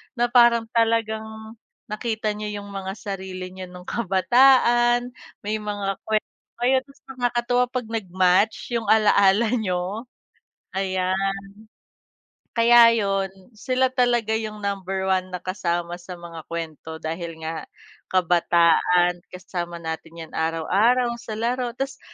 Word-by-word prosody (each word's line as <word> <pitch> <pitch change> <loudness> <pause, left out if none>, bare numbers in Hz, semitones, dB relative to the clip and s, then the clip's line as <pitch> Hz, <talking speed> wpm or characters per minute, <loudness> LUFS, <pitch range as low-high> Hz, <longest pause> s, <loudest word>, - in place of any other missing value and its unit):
na 240 - 0
parang 235 -2 +6
talagang 225 -1 +1 0.6
nakita 220 -1 -2
niyo 210 -1 -5
yung 200 - -11
mga 195 -1 -5
sarili 190 -2 -6
nyo 185 0 -8
nung 180 0 -12
kabataan, 240 +4 +4 0.3
may 210 +1 -1
mga 205 -2 -3
kwento 215 -1 0 0.3
kayo. 260 +2 +4
Tas 275 0 -20 0.2
nakakatuwa 245 0 +1
'pag 250 -2 -4
nag-match 190 0 +1
yung 225 - -4
alaala 210 0 +4
niyo, 190 +2 -2 0.7
ayan. 190 0 0 1.2
Kaya 235 0 +7
yun, 195 -2 0 0.2
sila 255 +4 0
talaga 240 -3 +1
yung 215 -1 -3
number 195 -1 -2
1 185 -1 +1
na 185 - -5
kasama 175 -1 -3
sa 180 0 -9
mga 170 -2 -10
kwento 160 -1 -6
dahil 165 +1 -5
nga 160 -1 -5 0.4
kabataan. 175 0 +3
Kasama 175 -1 -6
natin 165 0 -7
yan - - -22
araw-araw 205 +10 +2
sa 215 -2 -6
laro. 245 +2 -1
Tas 270 +1 -4
200 Hz, 120 wpm, -23 LUFS, 180-230 Hz, 1.2 s, Kaya